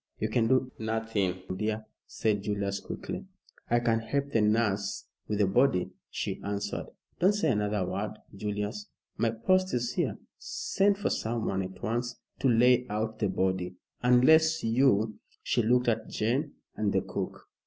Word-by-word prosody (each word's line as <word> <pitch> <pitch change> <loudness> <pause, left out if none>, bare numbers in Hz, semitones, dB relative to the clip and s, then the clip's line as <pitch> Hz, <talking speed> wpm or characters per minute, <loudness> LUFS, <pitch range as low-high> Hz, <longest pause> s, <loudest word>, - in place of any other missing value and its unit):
"You 110 - -1
can 115 0 +2
do 130 0 +2
nothing, 110 -4 -1
dear," 110 +2 -2 0.2
said 105 -3 0
Julius, 100 -1 -1
quickly. - - -6 0.4
"I 120 - +4
can 115 -1 +2
help 140 +5 -2
the 115 - +3
nurse 105 -2 +1 0.2
with 105 - -1
the 105 - +4
body," 95 -2 +2 0.2
she - - -3
answered. 100 0 -3 0.3
"Don't 190 +4 +5
say 160 -8 +2
another 105 -3 0
word, 105 +4 -3 0.2
Julius. 105 - -3 0.3
My 115 - +2
post 185 +11 +2
is 120 0 -1
here. - - 0 0.2
Send 205 - +1
for 205 - -1
someone 110 -4 -1
at 95 0 -7
once 120 +2 -1 0.2
to - - +2
lay 125 +1 +5
out 110 +1 -2
the 105 - +1
body, 95 -1 -1 0.3
unless 160 +6 +5
you 115 -2 +3
" - - -34
She - - +2
looked 125 +2 +3
at 115 -1 0
Jane 130 +7 0 0.2
and 105 -2 0
the - - +2
cook. - - -5
110 Hz, 160 wpm, -29 LUFS, 105-125 Hz, 0.4 s, Don't